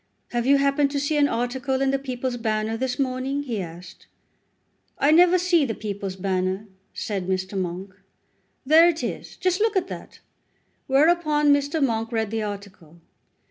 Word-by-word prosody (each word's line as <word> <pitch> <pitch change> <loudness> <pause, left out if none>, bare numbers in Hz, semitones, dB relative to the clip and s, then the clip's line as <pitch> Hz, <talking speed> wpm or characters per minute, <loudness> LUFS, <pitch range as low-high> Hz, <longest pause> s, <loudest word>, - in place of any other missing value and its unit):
"Have 240 0 -1
you 280 +1 +6
happened 280 +1 +2
to 280 0 -2
see 290 +2 -1
an 290 -1 +4
article 260 +2 -1
in 270 0 +2
the 275 - 0
'People's 255 -2 -3
Banner' 220 -1 -1
this 250 +2 -2
morning?" 270 +1 -1
he 235 -7 -3
asked. 175 +1 -10 0.9
"I 285 - +3
never 355 +3 +6
see 355 -3 +3
the 230 -5 -2
'People's 200 -3 -5
Banner,'" 190 +1 -1 0.3
said 195 -4 -4
Mr. 190 +1 -2
Monk. 185 +1 -4 0.7
"There 320 +5 +7
it 330 -1 -3
is; - - -5
just 370 0 0
look 440 0 +1
at 370 -1 0
that." - - -9 0.7
Whereupon 300 +1 +3
Mr. 285 +1 +1
Monk 225 -1 -2
read 220 -2 -1
the 225 -1 -1
article. 200 -6 -8
255 Hz, 165 wpm, -24 LUFS, 205-285 Hz, 0.9 s, There